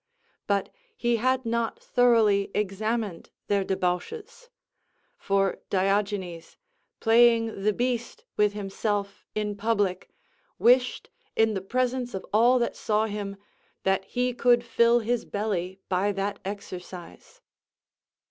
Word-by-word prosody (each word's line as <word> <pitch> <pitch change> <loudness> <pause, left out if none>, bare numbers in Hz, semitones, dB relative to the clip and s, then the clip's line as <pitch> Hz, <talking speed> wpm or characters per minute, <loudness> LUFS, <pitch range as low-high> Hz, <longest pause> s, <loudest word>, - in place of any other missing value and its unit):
But 200 -1 +1 0.3
he 240 -1 +1
had 255 +2 +1
not 230 0 -1
thoroughly 220 -5 +3
examined 210 -1 -2 0.2
their 200 -1 +1
debauches; 425 - -3 0.7
for 195 -1 0
Diogenes, 195 -3 -1 0.4
playing 225 -2 +4
the 210 +2 +3
beast 245 - -2
with 210 -1 +3
himself 200 0 -3
in 210 -1 -1
public, 205 -3 0 0.5
wished, 250 +1 +3 0.2
in 225 -1 +3
the 190 - -2
presence 250 +3 -1
of 190 - -5
all 240 +4 +5
that 240 - -1
saw 215 0 +1
him, 205 -2 -5 0.5
that 190 0 +1
he 250 0 -1
could 240 0 +3
fill 235 0 +3
his 240 +1 -1
belly 190 -3 -3
by 190 +2 +1
that 200 +1 -3
exercise. 185 - -8
210 Hz, 115 wpm, -26 LUFS, 195-240 Hz, 0.7 s, all